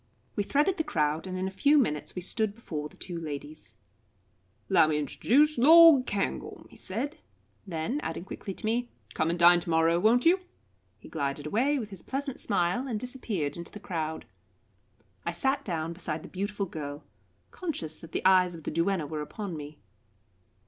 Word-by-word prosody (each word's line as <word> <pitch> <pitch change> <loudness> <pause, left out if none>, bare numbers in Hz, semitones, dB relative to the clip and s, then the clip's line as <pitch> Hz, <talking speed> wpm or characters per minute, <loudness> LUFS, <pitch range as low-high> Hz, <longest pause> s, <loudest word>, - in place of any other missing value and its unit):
We 205 - +1
threaded 295 - +1
the 320 - +1
crowd, 155 - 0
and 185 0 -4
in 185 +1 -1
a - - -4
few 290 +10 +4
minutes 150 - 0
we 180 - -4
stood 215 +1 -1
before 150 -10 -5
the - - -20
two 175 -2 -6
ladies. 150 0 -7 0.9
"'Lowmintrduce 225 - +3
L'd 315 -1 +8
Cairngorm," 200 -1 -3
he - - -15
said; 260 +11 -4 0.5
then, 175 - -2
adding 165 +2 -5
quickly 195 0 -7
to - - -8
me, 240 +2 0 0.2
"Come 160 - 0
and 170 - 0
dine 175 0 +7
to 170 - -7
morrow, 165 +1 +3
won't 230 - +4
you?" 355 +3 +5 0.6
He - - -14
glided 140 -1 -3
away 255 - +1
with 215 -5 -5
his 195 - -8
pleasant 275 0 -4
smile, 195 +5 0
and 225 -5 -2
disappeared 215 - -3
in 170 - -5
the 210 - -10
crowd. 160 -5 -4 1.0
I - - -1
sat 270 +1 0
down 165 - -3
beside 165 -2 -4
the - - -10
beautiful 200 +1 -3
girl, 145 -4 -7 0.5
conscious 310 - -4
that 165 - -13
the - - -3
eyes 185 -2 +5
of 160 - -11
the - - -3
duenna 170 0 0
were 155 0 -4
upon 185 +4 -5
me. 150 0 -8
185 Hz, 175 wpm, -28 LUFS, 160-245 Hz, 1.0 s, L'd